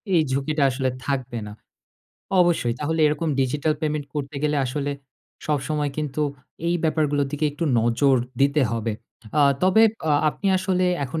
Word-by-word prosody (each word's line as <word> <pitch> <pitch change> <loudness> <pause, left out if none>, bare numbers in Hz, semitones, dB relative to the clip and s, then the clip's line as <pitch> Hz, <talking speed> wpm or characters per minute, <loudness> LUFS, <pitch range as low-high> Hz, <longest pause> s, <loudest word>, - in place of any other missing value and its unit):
এই 165 - +5
ঝুঁকিটা 140 +2 0
আসলে 130 0 -1 0.2
থাকবে 130 -4 -2
না। 105 - -8 0.9
অবশ্যই 165 -9 +2
তাহলে 160 +2 -1
এরকম 150 +2 0
ডিজিটাল 145 +4 +1
পেমেন্ট 150 -2 -2
করতে 140 0 -4
গেলে 150 -1 +1
আসলে 145 +2 -2 0.6
সবসময় 150 0 -1
কিন্তু 150 -1 -3 0.5
এই 175 - +2
ব্যাপার 155 -1 +2
গুলোর 145 -1 0
দিকে 150 +1 -1
একটু 165 - -3 0.2
নজর 130 +4 +3 0.2
দিতে 140 +1 +3
হবে। 115 -1 -1 0.5
আ - - +6 0.2
তবে 190 +4 +5 0.5
আপনি 195 - -4
আসলে 185 -1 0 0.2
এখন 155 +5 -4
145 Hz, 150 wpm, -23 LUFS, 135-155 Hz, 0.9 s, আ